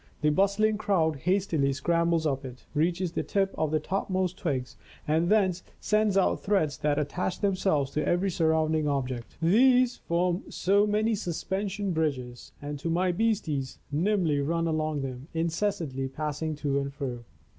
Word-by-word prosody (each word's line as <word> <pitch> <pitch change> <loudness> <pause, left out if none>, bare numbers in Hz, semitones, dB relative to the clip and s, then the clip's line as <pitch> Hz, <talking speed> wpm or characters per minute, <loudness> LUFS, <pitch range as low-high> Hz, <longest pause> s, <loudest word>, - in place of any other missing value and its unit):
The 150 -1 +3
bustling 200 +5 +2
crowd 180 -7 +1
hastily 165 -4 +1
scrambles 170 +3 +1
up 140 -2 0
it, 125 -2 -10
reaches 170 +3 0
the - - -1
tip 195 -1 0
of 155 - 0
the 155 +1 +1
topmost 185 +1 -1
twigs 140 -10 -3 0.3
and 160 +3 +2
thence 190 -4 +3 0.2
sends 215 -2 +2
out 195 - +2
threads 175 -9 +1
that 145 -1 +1
attach 160 +5 -2
themselves 185 -8 +1
to 150 - -1
every 185 +2 +1
surrounding 160 -2 +1
object. 130 -4 -3
These 245 +7 +4
form 175 +1 -1
so 200 +2 +2
many 215 +2 +1
suspension 195 +1 -2
bridges, 135 -7 -2
and 145 0 -6
my 175 +2 +2
beasties 175 -10 -1
nimbly 165 -1 +1
run 165 +4 0
along 155 -2 -1
them, 130 +1 -6
in 165 +1 +1
cessantly 165 -8 -2
passing 155 +2 -3
to 140 -1 0
and 140 0 -3
fro. 125 -4 -5
165 Hz, 155 wpm, -28 LUFS, 145-195 Hz, 0.3 s, These